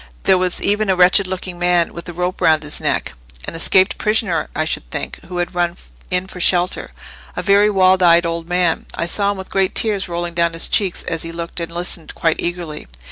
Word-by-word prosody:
There 185 - +4
was 180 -1 -1
even 205 0 +1
a 190 - +3
wretched 185 +2 +4
looking 185 -1 -5
man, 175 -1 +1
with 170 +1 -8
a - - -4
rope 180 +2 -3
round 155 -1 +3
his 150 - -3
neck—an - - -4
escaped 185 +4 +3
prisoner, 215 -5 0
I 155 - 0
should - - -3
think, - - -5
who 180 0 -6
had 175 +1 -2
run 175 0 -1 0.3
in 180 0 0
for 185 -1 -9
shelter—a 65 - -2
very 200 +2 +4
wild 190 -2 +3
eyed 170 -1 +5
old 165 0 -3
man: 180 -2 0
I 170 - -2
saw 200 +4 +1
him 200 - -2
with 190 - -9
great 195 -1 0
tears 205 -4 +2
rolling 170 0 -3
down 170 0 +1
his 165 - +1
cheeks, 195 -4 +1
as 165 -1 -3
he 165 - -3
looked 170 +1 -6
and 170 0 -4
listened 175 -1 -4
quite 165 -1 +1
eagerly." 170 - -4
175 Hz, 210 wpm, -18 LUFS, 165-185 Hz, 0.3 s, eyed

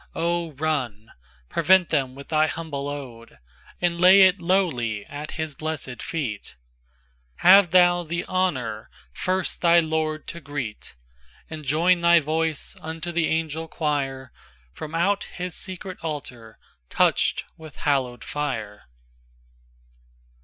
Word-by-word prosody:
Oh! 170 -1 -1
run; 130 -7 -2 0.4
prevent 175 - +3
them 135 -4 0
with 140 0 -11
thy 155 0 +3
humble 150 -4 -4
ode, 125 - -8 0.4
And 170 -1 0
lay 190 +2 +8
it 185 0 +4
lowly 135 - 0
at 145 +1 -7
his 160 -1 -3
blessèd 150 -4 -5
feet; 125 -11 -4 0.8
Have 185 +1 +7
thou 175 0 +5
the 170 +1 -4
honour 130 - -1 0.2
first 185 - -1
thy 170 0 +6
Lord 155 -1 -1
to 170 - -7
greet, 140 - -6 0.6
And 155 -1 -6
join 170 +6 +2
thy 170 0 +6
voice 160 0 -2
unto 160 +2 -5
the 170 -1 +1
Angel 160 0 -2
Quire, 135 -5 -2 0.4
From 155 +1 -7
out 195 +4 +1
his 180 -1 -4
secret 185 +1 -6
altar 125 -8 -6 0.3
touched - - +2
with 155 -3 -12
hallowed 130 -4 -1
fire. 115 -8 -4
155 Hz, 125 wpm, -24 LUFS, 135-170 Hz, 0.8 s, lay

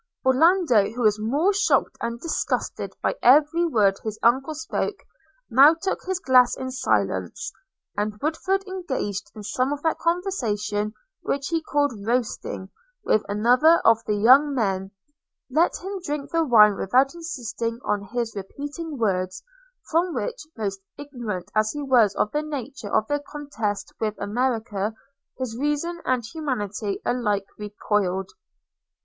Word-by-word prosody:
Orlando, 265 - +4
who 245 +2 -4
was 210 -1 +3
more 285 - +1
shocked 400 - +2
and 235 0 -3
disgusted 335 - -2
by - - +1
every 305 +6 +5
word 205 -9 +2
his 215 -1 -4
uncle 265 +6 +3
spoke, 325 +6 -3 0.5
now 280 +6 +7
took 380 +4 -3
his 375 -1 0
glass 255 -7 +4
in 260 0 -4
silence; 355 +6 -1 0.4
and 210 0 -2
Woodford, 375 - -1
engaged 265 - -4
in 210 - -8
some 255 +6 -1
of 290 0 -4
that 320 - 0
conversation 220 - -1 0.3
which 275 0 -2
he 330 -1 0
called 290 -3 0
roasting, 225 -4 -2 0.3
with 215 - +3
another 245 +10 +5
of 225 0 +5
the 210 - +1
young 265 +7 +5
men, 195 -5 -1 0.6
let 320 +6 +2
him 385 +1 -6
drink 290 -4 -4
the 330 0 +2
wine 210 -6 +6
without 260 +7 +2
insisting 235 -9 -4
on 205 -1 -1
his 235 -2 -2
repeating 290 - -6
words, 185 -5 -1 0.5
from 335 0 +1
which, 245 +6 -4
almost 195 -3 -3 0.2
ignorant 240 -10 -6
as 215 0 +2
he 295 - -4
was 240 -7 +4
of 210 - 0
the 300 - 0
nature 275 -7 -6
of 215 - +2
the 290 0 0
contest 285 -8 -4
with 215 -1 -1
America, 220 -1 -1 0.4
his 255 -4 -4
reason 295 +6 -2
and 255 -3 0
humanity 215 - -3
alike 210 -5 0
recoiled. 205 -2 -1
250 Hz, 145 wpm, -24 LUFS, 210-300 Hz, 0.6 s, now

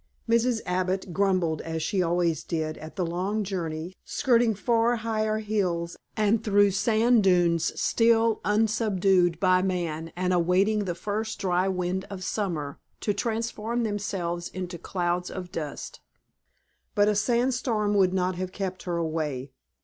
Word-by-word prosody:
Mrs. 230 0 +2
Abbott 185 0 -1
grumbled 185 -4 +1
as 160 -1 -4
she 195 -3 0
always 170 -2 +1
did 155 -2 -2
at 155 +1 -10
the 185 -3 -1
long 190 +6 -1
journey, 170 -3 -4
skirting 240 -5 +2
far 230 +4 +2
higher 215 -1 -1
hills, 185 -6 -1 0.2
and 215 +1 +2
through 205 -1 +4
sand 225 +3 +3
dunes 175 -3 +3
still 230 -1 +3
unsubdued 200 -5 +2
by 185 -2 +4
man 170 -4 -2
and 180 +1 0
awaiting 190 +4 +2
the 175 -2 -2
first 215 +4 -3
dry 180 0 +1
wind 185 0 -1
of 195 -2 -6
summer 170 -8 -3 0.2
to 205 - 0
transform 230 +2 -2
themselves 190 -5 -2
into 180 -2 -6
clouds 180 -1 -2
of 180 -2 -7
dust. 150 -3 -6 1.0
But 205 0 +4
a 210 - +3
sand 240 +5 +2
storm 220 -4 0
would 190 -3 +4
not 185 0 0
have 185 0 -3
kept 190 -1 -4
her 175 -2 -1
away. 155 -5 -2
190 Hz, 145 wpm, -26 LUFS, 175-215 Hz, 1.0 s, through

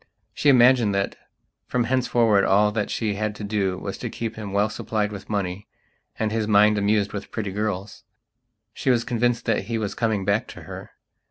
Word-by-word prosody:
She 145 - +2
imagined 125 -5 +5
that, 100 0 -1 0.5
from 125 -1 0
henceforward, 120 -4 +2
all 105 +2 +4
that 105 -1 -2
she 110 -3 -1
had 105 +1 -2
to 105 - -8
do 100 -3 -1
was - - -6
to - - -4
keep 115 -1 -5
him 105 -3 -6
well 100 +2 +2
supplied 105 0 -2
with 100 -1 -9
money 100 -2 -3 0.5
and 110 -1 -1
his 110 -1 -1
mind 105 0 +5
amused 100 0 +1
with 100 -1 -6
pretty 105 -4 -4
girls. 105 0 -4 0.7
She - - -2
was 120 -2 +3
convinced 120 -1 0
that 115 - 0
he 115 -1 -2
was 105 -3 -2
coming 110 -4 -1
back 100 +2 +1
to - - -11
her. - - -9
105 Hz, 190 wpm, -24 LUFS, 100-115 Hz, 0.7 s, imagined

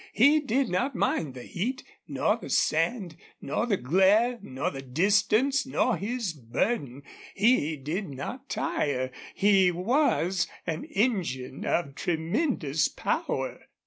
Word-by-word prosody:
He 285 +8 +5
did 270 -2 0
not 250 +9 -1
mind 165 - 0
the 125 - -8
heat 250 - -3 0.2
nor - - +1
the - - -9
sand 195 -10 +1 0.2
nor 185 +11 -2
the 205 -5 +2
glare 195 - +3
nor 130 -8 -3
the 135 - -7
distance 210 - +2
nor 255 -2 +1
his 210 +1 -3
burden. 140 - -2 0.3
He 200 - +3
did 160 +8 -4
not 190 - -7
tire. 130 -3 -1 0.2
He 195 -2 +4
was 185 - +1 0.2
an 160 -2 -3
engine 185 - -1
of 150 -5 0
tremendous 160 - 0
power. - - -3
190 Hz, 125 wpm, -27 LUFS, 150-240 Hz, 0.3 s, He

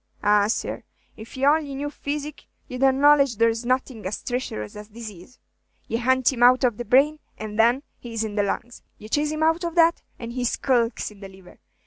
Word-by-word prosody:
Ah, 205 0 +4
sir, 220 - -2 0.3
if 220 +4 -11
ye 265 - +1
only 290 -1 +2
knew 290 +1 -4
physic, 295 0 -6 0.2
ye 255 - -7
'd 250 - -6
acknowledge 275 -1 +4
there 230 +1 +3
's 230 +2 -6
nothing 255 -2 -1
as 200 - -5
treacherous 245 - -4
as 210 0 -10
dizaze. 215 -1 -11 0.5
Ye 230 - -2
hunt 260 +1 +2
him 240 - -6
out 250 +2 +6
of 240 -4 +2
the 240 - -5
brain, 280 +7 +3 0.2
and 215 0 -6
then 240 +5 +4 0.2
he 240 - -9
is 225 -1 -1
in 215 -2 -4
the 205 - +1
lungs. 235 +4 -4 0.2
Ye 215 - -11
chase 295 +5 +1
him 310 +1 -2
out 325 +2 +2
of 340 0 -3
that, 335 0 +4 0.2
and 235 -1 -7
he 250 0 -3
skulks 240 -2 0
in 205 - -16
the 195 -1 -9
liver. 190 -2 -17
245 Hz, 215 wpm, -24 LUFS, 220-280 Hz, 0.5 s, out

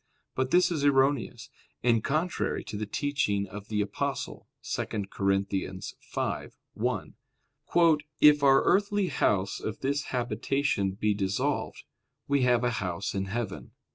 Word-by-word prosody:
But 130 0 -1
this 180 +3 +4
is 155 -4 -1
erroneous, 135 -4 +2 0.3
and 115 -2 +3
contrary 165 +5 -1
to - - -7
the 105 0 -3
teaching 105 -6 0
of 100 +1 -9
the 105 -1 0
Apostle 105 - -3 0.2
(2 - - -2
Cor. 100 -1 -3
5:1): 95 -1 -3 1.1
"If 150 -1 +7
our 135 -1 +5
earthly 200 -1 +2
house 95 -1 +1
of 110 +1 -5
this 140 +1 0
habitation 120 -3 -1
be 105 +2 +1
dissolved, 100 -1 -1 0.4
we 140 -1 +2
have 125 -1 +3
a 120 - +2
house 90 +1 -3
in 95 -1 -1
heaven." 105 0 -5
115 Hz, 130 wpm, -28 LUFS, 100-140 Hz, 1.1 s, If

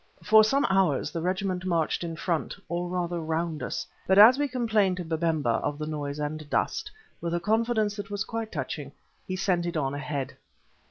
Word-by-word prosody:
For 220 0 +7
some 275 +6 +2
hours 190 -8 +2
the 165 - -3
regiment 185 +1 -1
marched 170 -3 0
in 165 -1 -4
front, 170 -1 -2
or 175 +1 -2
rather 175 -1 -2
round 160 -1 -2
us, 130 +1 -3 0.2
but 190 - +4
as 230 +6 +9
we 290 - +2
complained 220 -7 +1
to 180 - -4
Babemba 160 -7 0
of 145 - -2
the 155 - -4
noise 145 -2 -4
and 150 0 -4
dust, 445 - -1 0.3
with 170 0 -1
a - - +1
confidence 220 +2 +1
that 200 -1 -6
was 205 0 -2
quite 225 -1 -4
touching, 140 -1 -5 0.3
he 185 - -2
sent 185 -2 0
it 170 -1 -2
on 135 -2 -1
ahead. 145 -1 -4
175 Hz, 195 wpm, -27 LUFS, 155-205 Hz, 0.3 s, as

